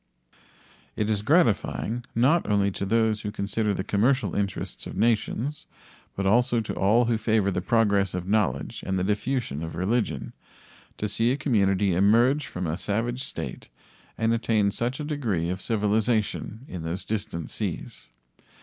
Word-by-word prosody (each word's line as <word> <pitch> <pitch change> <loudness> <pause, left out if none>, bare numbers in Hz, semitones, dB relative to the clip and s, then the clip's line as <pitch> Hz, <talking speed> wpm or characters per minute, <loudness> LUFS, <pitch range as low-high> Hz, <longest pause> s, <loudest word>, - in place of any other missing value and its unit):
It 110 0 0
is 105 -2 0
gratifying, 120 - +1
not 135 +8 +3
only 100 -1 +2
to 100 - -4
those 110 0 +2
who 105 - -3
consider 105 +1 -1
the 95 - -2
commercial 125 +7 +1
interests 100 -1 -3
of - - -7
nations, 120 +6 0 0.5
but 100 - -2
also 120 +4 +3
to 110 - -3
all 110 +5 +3
who 115 -1 +1
favor 110 -3 +2
the 90 - -1
progress 100 -2 +2
of 90 0 -4
knowledge 105 -1 0
and 95 0 0
the 90 - 0
diffusion 105 - -1
of 80 0 -5
religion, 110 +6 -1 0.6
to 105 - -2
see 115 +3 +2
a 135 - 0
community 100 -8 +2
emerge 120 - +3
from 90 0 -4
a 80 +1 -2
savage 120 +6 -1
state - - -5 0.5
and 115 +1 +2
attain 110 -3 +2
such 120 +5 -2
a - - -3
degree 110 - -1
of 95 +1 -4
civilization 110 +1 0
in 90 - -6
those 85 +4 -4
distant 100 -6 -4
seas. - - -5
105 Hz, 160 wpm, -26 LUFS, 100-120 Hz, 0.6 s, not